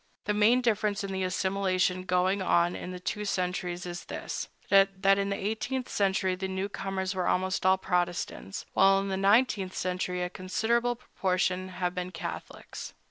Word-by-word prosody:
The 210 - +1
main 220 +5 +4
difference 210 -3 +1
in 195 - -4
the 190 0 -2
assimilation 185 0 0
going 185 +2 +2
on 175 -1 +2
in - - -6
the 180 0 -6
two 210 +3 -3
centuries 180 -2 -2
is 175 -1 -6
this, - - -5 0.2
that 195 0 +5
in 200 0 0
the 200 - 0
eighteenth 235 +5 -2
century 190 -2 +1
the 190 +1 -3
newcomers 190 0 -3
were 185 -1 -1
almost 185 0 +1
all 190 0 +5
Protestants, 175 - -2
while 195 0 +5
in 195 0 -3
the 190 - 0
nineteenth 195 -1 +3
century 180 0 -2
a 180 - -2
considerable 235 +6 0
proportion 185 -5 -1
have 180 -1 -2
been 180 0 -3
Catholics. 175 - -7
190 Hz, 165 wpm, -29 LUFS, 180-200 Hz, 0.2 s, that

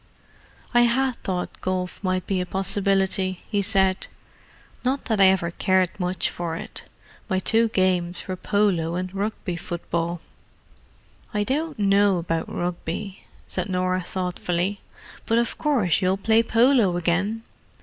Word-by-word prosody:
"I 240 - +6
had 250 +1 +2
thought 180 -2 -4
golf 185 +1 -3
might 185 -1 0
be 190 -2 0
a - - -2
possibility," 190 -1 0
he 205 -2 +2
said. 190 -2 +1 0.8
"Not 265 +2 0
that 220 -4 +1
I - - +9
ever 185 -3 +2
cared 185 +1 +1
much 180 -1 0
for 170 -2 -4
it. - - -7 0.4
My 190 - +1
two 225 +5 +3
games 185 -4 0
were 185 - -2
polo 185 -4 +1
and 185 +1 -3
Rugby 200 -2 -3
football." 170 0 -3 1.2
"I 210 - +2
don't 295 +5 -2
know 200 -1 +4
about 165 -1 -2
Rugby," 175 +2 -4 0.2
said - - -2
Norah 185 0 0
thoughtfully. 180 +1 -2 0.5
"But 225 - +3
of 235 0 +1
course 230 - +2
you'll 185 +1 +2
play 220 +3 +4
polo 230 -5 +3
again. 190 +6 0
190 Hz, 140 wpm, -24 LUFS, 180-210 Hz, 1.2 s, I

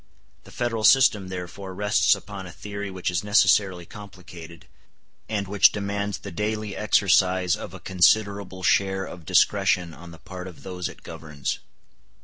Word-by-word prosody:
The - - -14
Federal 115 -3 -2
system 105 -5 +5
therefore 95 +1 -7
rests 105 +1 +3
upon 100 -1 -9
a - - -9
theory 100 +2 -7
which 95 -1 -3
is 85 +1 -1
necessarily 95 -3 +3
complicated, 90 -5 -12 0.6
and 100 -3 -2
which 100 0 +5
demands 100 0 -3
the 100 - -9
daily 105 +2 -3
exercise 95 -3 +2
of - - -9
a - - -9
considerable 95 0 +1
share 95 +1 +2
of 85 -3 -11
discretion 90 -2 +2
on 85 +1 -12
the 85 - -12
part 90 +1 -9
of 90 - -12
those 90 -2 -5
it - - -14
governs. 75 -4 -5
95 Hz, 150 wpm, -24 LUFS, 90-105 Hz, 0.6 s, system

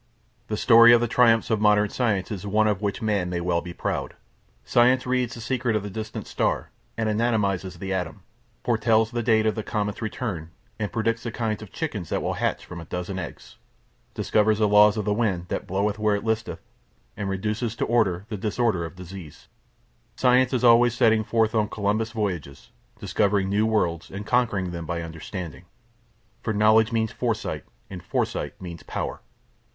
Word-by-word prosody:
The 105 - -2
story 115 0 +7
of 120 - +6
the 120 - +1
triumphs 115 -1 +3
of 110 -2 +1
modern 105 0 +4
science 105 -6 -1
is 105 -1 -5
one 110 +2 +2
of 105 -2 0
which 105 +2 -2
Man 100 -5 0
may 90 -1 -2
well 85 -1 0
be 90 - -8
proud. - - -3 0.5
Science 125 +2 +4
reads 125 -1 0
the 115 - -8
secret 120 -1 -1
of 105 - 0
the 105 - -6
distant 110 +2 -6
star - - -1 0.3
and 115 -1 0
anatomises 105 -5 0
the 95 +2 -4
atom; 90 -3 -4 0.4
foretells 115 -1 +2
the 120 -1 -1
date 110 -1 +3
of 110 - +2
the 110 - -3
comet's 105 -1 -3
return 110 - -4 0.3
and 105 -2 -2
predicts 115 0 0
the 115 - -4
kinds 110 -2 -2
of 110 - -10
chickens 110 - -4
that - - -1
will - - -1
hatch - - -2
from 85 -2 -8
a - - -9
dozen 90 +3 -4
eggs; 85 - -9 0.6
discovers 110 0 +2
the 105 -1 +3
laws 105 +1 +6
of 105 - -2
the 105 - +1
wind 95 -6 -1
that - - -3
bloweth 100 +3 -1
where 105 -1 +2
it 100 - -4
listeth 110 -6 -2 0.5
and 100 - -3
reduces 105 +4 -2
to - - -1
order 100 -6 +1
the 110 -2 -5
disorder 105 -2 0
of 85 - -9
disease. 90 -3 -11 0.7
Science 125 0 +3
is 125 -2 0
always 120 0 +6
setting 110 -3 +3
forth 110 0 +1
on 110 -2 +1
Columbus 105 +2 -1
voyages, 90 - -4 0.3
discovering 100 -2 +1
new 105 +2 +2
worlds 85 -7 0
and 100 +2 -7
conquering 110 -7 +1
them 85 -2 -6
by 85 0 -3
understanding. 85 +1 -7 0.8
For 110 - -2
Knowledge 110 +2 +4
means 110 -1 0
Foresight - - -3 0.2
and 90 -2 -8
Foresight - - -2
means 85 -2 -8
Power. - - -4
105 Hz, 185 wpm, -25 LUFS, 95-115 Hz, 0.8 s, story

